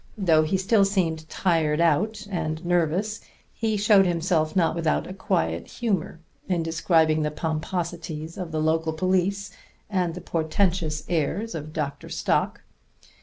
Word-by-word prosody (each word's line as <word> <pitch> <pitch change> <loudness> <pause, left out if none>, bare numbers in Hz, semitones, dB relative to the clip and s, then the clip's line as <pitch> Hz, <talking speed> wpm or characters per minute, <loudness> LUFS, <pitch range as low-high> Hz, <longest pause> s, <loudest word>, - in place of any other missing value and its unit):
Though 165 -6 +4
he 155 +5 +1
still 195 +2 +3
seemed 165 -5 0
tired 160 -4 +1
out 205 +7 +1
and 160 -2 -3
nervous, 175 +5 0 0.3
he 220 -2 -1
showed 200 -2 +5
himself 165 -2 0
not 170 -4 +3
without 165 -2 0
a 185 - -7
quiet 80 - -1
humor 195 -8 -2 0.3
in 175 -3 +1
describing 160 -1 +2
the 150 - 0
pomposities 160 0 -4
of 180 -4 -5
the 155 - -1
local 160 0 +1
police 185 +3 0 0.4
and 180 -4 0
the - - -5
portentous 165 -1 0
airs 175 +7 -1
of 155 -2 -6
Dr. 145 -3 -4
Stock. - - 0
170 Hz, 140 wpm, -25 LUFS, 155-190 Hz, 0.4 s, showed